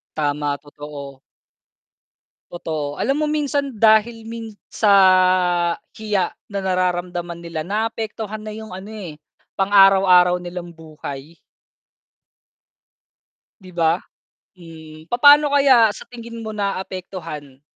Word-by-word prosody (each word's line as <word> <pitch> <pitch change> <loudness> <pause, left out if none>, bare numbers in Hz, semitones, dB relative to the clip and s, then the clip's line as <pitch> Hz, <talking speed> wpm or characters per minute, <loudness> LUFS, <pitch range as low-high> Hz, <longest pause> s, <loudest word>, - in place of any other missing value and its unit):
Tama, 145 -1 -1
totoo. 145 -2 -10 1.3
Totoo. 155 -4 -5
Alam 275 +6 0
mo - - +2
minsan 285 -2 -1
dahil 220 +1 +3
min 230 -1 -7 0.2
sa 205 -2 +2 1.0
hiya 205 -4 -1 0.2
na 200 - -2
nararamdaman 175 -2 -2
nila, 170 -2 -5
naapektuhan 215 +1 -3
na 215 - -6
yung 220 -2 -9
ano 190 +3 -9
eh, 200 -7 -8 0.4
pang 195 +1 -1
araw-araw 190 -3 +6
nilang 175 0 -7
buhay. 155 -1 -9 2.2
'Di 185 -1 -13
ba? 165 +1 +2 0.6
Mhm. 160 -2 -13
Papaano 285 - +6
kaya 260 -6 +5
sa - - -10
tingin 235 -1 -9
mo 220 - -5
naapektuhan? 185 -8 -6
185 Hz, 105 wpm, -20 LUFS, 165-220 Hz, 2.2 s, araw-araw